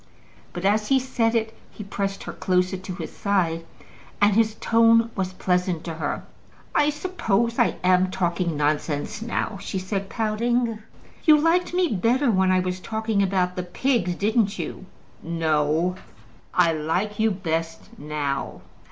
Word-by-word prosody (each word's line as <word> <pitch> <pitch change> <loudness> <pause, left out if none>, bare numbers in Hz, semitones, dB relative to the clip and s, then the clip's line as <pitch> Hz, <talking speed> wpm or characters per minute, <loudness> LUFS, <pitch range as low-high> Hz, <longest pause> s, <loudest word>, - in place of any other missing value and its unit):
But 175 +2 -5
as 210 +1 +2
he 270 - +4
said 240 -3 0
it, 225 -1 -1
he 210 - -9
pressed 195 0 -3
her - - -6
closer 185 0 +1
to 185 -1 -6
his 170 -3 -7
side, 175 -5 0 0.6
and 205 0 +4
his 220 -1 +3
tone 230 0 +4
was 185 -1 -2
pleasant 180 -2 0
to 165 - -5
her. 155 -2 -3 0.5
"I 295 - +3
suppose 235 - -1
I'm 185 0 +3
talking 175 -3 -1
nonsense 150 +4 -1
now?" 225 -3 -2
she 195 - -4
said, 195 +1 -3
pouting. 230 +1 0 0.4
"You 310 -3 +7
liked 335 +3 +2
me 365 -1 +3
better 240 - +2
when 190 -2 +3
I 185 0 +3
was 185 0 -3
talking 220 +1 -1
about 185 -2 +1
the 180 - -2
pigs; 180 +1 0
didn't 210 +1 +1
you?" 190 - -6 0.3
"No; 160 +1 +1 0.6
I 170 -2 +3
like 180 +7 -2
you 220 +1 +4
best 165 -4 -4
now." 145 -2 -3
195 Hz, 150 wpm, -24 LUFS, 175-225 Hz, 0.6 s, You